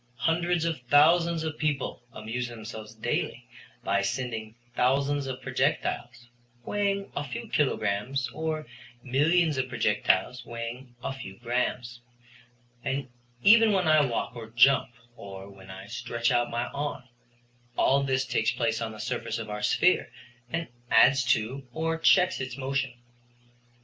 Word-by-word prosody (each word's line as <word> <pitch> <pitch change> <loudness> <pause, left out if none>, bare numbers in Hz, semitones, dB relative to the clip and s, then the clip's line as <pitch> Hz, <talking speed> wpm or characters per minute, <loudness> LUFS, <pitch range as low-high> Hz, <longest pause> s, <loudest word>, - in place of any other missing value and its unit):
Hundreds 165 +4 +1
of 160 -5 -2
thousands 165 +3 +5
of 155 -1 -4
people 145 -5 -1
amuse 115 +2 -4
themselves 110 -1 -9
daily 110 - -2 0.4
by - - +1
sending 115 -4 -3 0.2
thousands 140 +2 +1
of 130 0 -6
projectiles 120 - -1 0.4
weighing 200 -1 -1
a 145 - -1
few 125 -4 -6
kilograms 130 -1 0
or 155 -1 -3 0.4
millions 150 +4 +2
of 130 0 -1
projectiles 115 0 +1
weighing 120 +2 -7
a - - -2
few 95 -8 -9
grammes, 120 0 -2 0.8
and 135 -1 -2 0.3
even 225 0 +7
when 185 -3 +2
I 155 -1 +6
walk 120 -1 -2
or 115 -2 -8
jump, 125 +4 +5 0.3
or 95 -2 -9
when 95 -1 -15
I 95 +1 -9
stretch 115 +1 -2
out 120 0 +2
my 120 +1 -1
arm, 145 -2 -4 0.7
all 140 +1 +4
this 130 -1 0
takes 110 -2 +1
place 115 -1 -1
on 110 -1 -3
the 110 - -11
surface 120 +3 -3
of 110 -2 -6
our 105 0 -4
sphere 180 -4 +2 0.4
and 165 0 -2 0.2
adds 130 +4 +6
to 115 +4 0
or 165 +2 -1
checks 180 -1 +4
its 130 -1 -5
motion. 135 -1 -2
130 Hz, 140 wpm, -28 LUFS, 115-150 Hz, 0.8 s, even